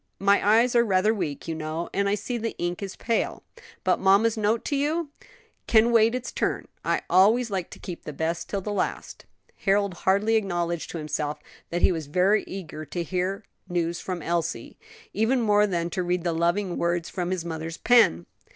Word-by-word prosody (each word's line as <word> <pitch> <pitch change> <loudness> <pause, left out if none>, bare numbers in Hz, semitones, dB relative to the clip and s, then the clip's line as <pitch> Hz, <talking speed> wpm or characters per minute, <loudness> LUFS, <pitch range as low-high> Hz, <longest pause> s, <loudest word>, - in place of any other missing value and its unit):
My 200 +1 +3 0.2
eyes 245 +1 +1
are 235 - +6
rather 205 0 +2
weak, 165 -9 -4
you 165 - -2
know, 160 +1 -4
and 200 0 +1
I 205 - +2
see 220 +4 -4
the 230 0 -4
ink 175 +2 -3
is 195 -1 -5
pale." 230 0 -1 0.4
"But - - +2
mamma's 200 +4 +4
note 220 +1 0
to 290 - -1
you?" 300 +3 0 0.6
"Can 225 +1 +5
wait 230 +1 +4
its 250 -1 -4
turn. - - -2 0.2
I - - 0
always 215 +6 +4
like 185 -3 -2
to - - -11
keep 175 -2 -8
the - - -6
best 165 +3 -3
till 200 - -2
the 210 +2 -4
last." - - -3 0.3
Harold 200 -1 +1
hardly 200 +5 +2
acknowledged 175 -5 -2
to - - -5
himself 150 -1 -3 0.3
that 175 +1 -2
he - - +6
was 160 -4 -4
very 185 +7 +2
eager 160 -5 -7
to 170 +4 -4
hear 185 +4 -2 0.3
news 170 -1 -1
from 180 -4 -5
Elsie; 170 -1 -2 0.4
even 230 +5 +2
more 210 -2 +3
than 170 -3 -2
to 185 - -1
read 180 -1 -1
the 170 -1 0
loving 175 +3 0
words 170 0 0
from 180 -1 -3
his 185 -2 -2
mother's 160 0 -5
pen. 230 - +4
185 Hz, 195 wpm, -25 LUFS, 170-215 Hz, 0.6 s, are